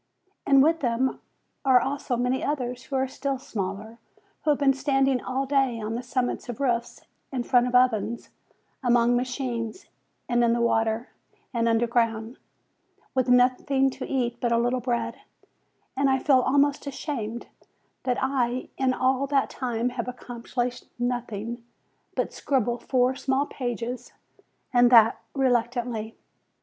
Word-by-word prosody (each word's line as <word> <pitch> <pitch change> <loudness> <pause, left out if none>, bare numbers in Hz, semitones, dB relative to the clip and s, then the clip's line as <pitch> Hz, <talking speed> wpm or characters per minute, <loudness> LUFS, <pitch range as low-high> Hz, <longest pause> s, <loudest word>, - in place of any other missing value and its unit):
And 275 -1 +6
with 325 +2 +3
them 255 0 0 0.4
are 260 -2 +6
also 265 -1 -2
many 250 +2 0
others, 250 -3 -2
who 275 - -5
are 265 0 +1
still 275 +1 -3
smaller, 215 -1 -5 0.4
who 305 - 0
have 295 - +4
been 275 -1 +4
standing 270 -1 +1
all 265 +1 -2
day 270 -4 +1
on 215 0 -3
the 235 - -2
summits 250 0 -2
of 240 - -5
roofs, 240 -3 -1 0.3
in 255 -3 -2
front 245 0 +3
of 250 - -2
ovens, 235 -2 +2 0.5
among 240 -1 +4
machines, 245 - -3 0.4
and 240 -1 +2
in 235 0 +3
the 235 - 0
water, 225 +1 +1 0.4
and 230 -1 +1
underground, 230 0 0 0.7
with 255 -1 +1
nothing 255 +2 +3
to - - -7
eat 240 -3 -1
but 240 -1 0
a 235 - +4
little 245 +2 +1
bread; 240 -1 -2 0.7
and 275 +1 +2
I 265 - +3
feel 265 -1 +4
almost 285 +3 +2
ashamed, 250 -5 -4 0.6
that 250 -2 0
I 255 -2 -1
in 260 -1 +2
all 260 +1 +1
that 275 -1 +1
time 245 -1 -1
have 245 -1 -4
accomplished 245 0 -4
nothing 240 -1 -3 0.5
but - - -1
scribble 245 -3 0
four 255 -1 +2
small 265 +1 0
pages, 245 -2 -5 0.6
and 245 0 +6
that 230 -1 +7 0.2
reluctantly. 240 -3 0
250 Hz, 145 wpm, -26 LUFS, 235-265 Hz, 0.7 s, that